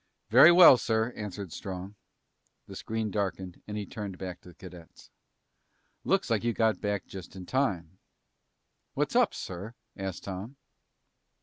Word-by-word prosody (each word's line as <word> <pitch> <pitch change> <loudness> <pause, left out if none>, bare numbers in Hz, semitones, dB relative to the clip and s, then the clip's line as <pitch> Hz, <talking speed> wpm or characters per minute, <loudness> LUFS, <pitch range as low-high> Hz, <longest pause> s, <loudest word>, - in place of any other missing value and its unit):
"Very 135 +8 +9
well, 175 -7 +9
sir," 110 +1 0
answered 100 -4 -6
Strong. 95 0 -7 0.7
The - - -11
screen 110 -1 -3
darkened 95 -3 -3
and 105 0 -5
he 105 - -4
turned 100 -2 -7
back 90 -1 -7
to - - -14
the 85 - -16
cadets. 90 -3 -14 0.9
"Looks - - 0
like - - +1
you 120 0 0
got 110 -5 +1
back 105 -1 -2
just 95 -1 -10
in 95 -1 -8
time." 95 - -2 1.0
"What's - - -1
up, - - +4
sir?" 95 +6 -7 0.2
asked 95 -2 -5
Tom. 100 +7 -7
100 Hz, 145 wpm, -29 LUFS, 90-110 Hz, 1.0 s, Very